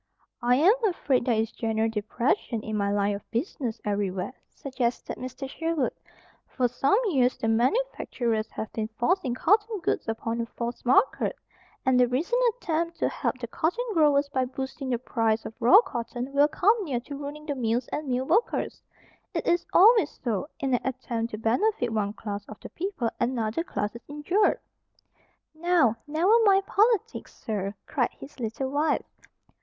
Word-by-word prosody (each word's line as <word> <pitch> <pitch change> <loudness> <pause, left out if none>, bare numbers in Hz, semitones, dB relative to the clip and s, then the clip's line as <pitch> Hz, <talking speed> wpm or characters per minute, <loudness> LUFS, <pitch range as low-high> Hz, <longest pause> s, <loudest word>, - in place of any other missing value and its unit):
"I 245 +1 +4
am 335 +10 +6
afraid 280 - +1
there 240 - +2
is 220 0 -1
general 225 -1 0
depression 225 - -1
in 215 - -4
my 200 -1 0
line 205 0 +1
of 200 - -10
business 240 - -3
everywhere," 200 +1 -2 0.2
suggested 255 -3 -3
Mr. 255 +2 -6
Sherwood. 325 -1 -1 0.5
"For 255 -2 0
some 270 - +2
years 260 - +2
the 225 - -2
manufacturers 235 - 0
have 220 - -6
been 220 -1 -2
forcing 270 -3 +1
cotton 420 - +2
goods - - -1
upon 225 +1 -2
a 230 - -4
false 235 +1 -5
market. 260 - +3 0.5
And 260 -1 +4
the 250 - +5
recent 330 - 0
attempt 335 -6 -2
to - - +1
help - - -2
the 250 - -5
cotton 345 - -1
growers 295 -4 +4
by 260 -2 0
boosting 265 +1 -5
the 245 - +1
price 225 -2 0
of - - -6
raw 255 - +8
cotton 240 - -5
will 285 +1 +5
come 410 +8 +2
near 270 -9 -2
to 285 +3 -8
ruining 290 +2 -7
the 295 - -2
mills 240 -1 -1
and 300 -1 -4
mill 255 0 0
workers. 455 - 0 0.5
It - - -1
is 345 0 +1
always 440 +4 +5
so. 235 +2 -1
In 270 -4 -1
an 245 - +2
attempt 240 -3 -3
to 215 - -5
benefit 245 - +1
one 205 -2 0
class 205 -2 -5
of 215 - -10
the - - -9
people 330 - -3
another 235 +3 0
class 210 - -3
is 235 - -8
injured." 320 +8 +1 0.9
"Now, 320 -8 +3
never 350 +10 +4
mind 390 -2 +4
politics, 435 0 +1
sir!" 200 -2 -4
cried - - 0
his 280 0 -12
little 245 +3 -3
wife. 295 +2 +1
255 Hz, 170 wpm, -27 LUFS, 230-320 Hz, 0.9 s, raw